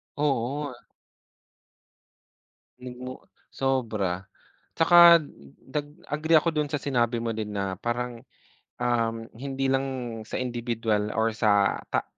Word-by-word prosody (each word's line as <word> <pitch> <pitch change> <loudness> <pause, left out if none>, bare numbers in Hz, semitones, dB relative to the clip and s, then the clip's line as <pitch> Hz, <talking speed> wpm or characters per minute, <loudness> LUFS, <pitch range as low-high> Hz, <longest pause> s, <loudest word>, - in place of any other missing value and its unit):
Oo, 145 0 0
ah. - - -11 2.0
Mm. 125 0 -8 0.3
Sobra! 110 -9 -1 0.5
Tsaka 170 0 +8 0.4
dag 145 +2 -4 0.2
agree 160 +2 +3
ako 165 +1 -1
dun 150 -2 -1
sa 145 - -1
sinabi 120 -4 0
mo 115 -1 -2
din 105 -1 -4
na 100 -2 -2
parang, 120 +3 -3 0.6
um, 115 -2 +1 0.2
hindi 135 +2 -2
lang 130 -4 -2
sa - - -6
indibiduwal 115 -4 -1
or 110 0 +2
sa 105 -2 +2
ta - - 0
125 Hz, 115 wpm, -26 LUFS, 115-135 Hz, 2.0 s, Tsaka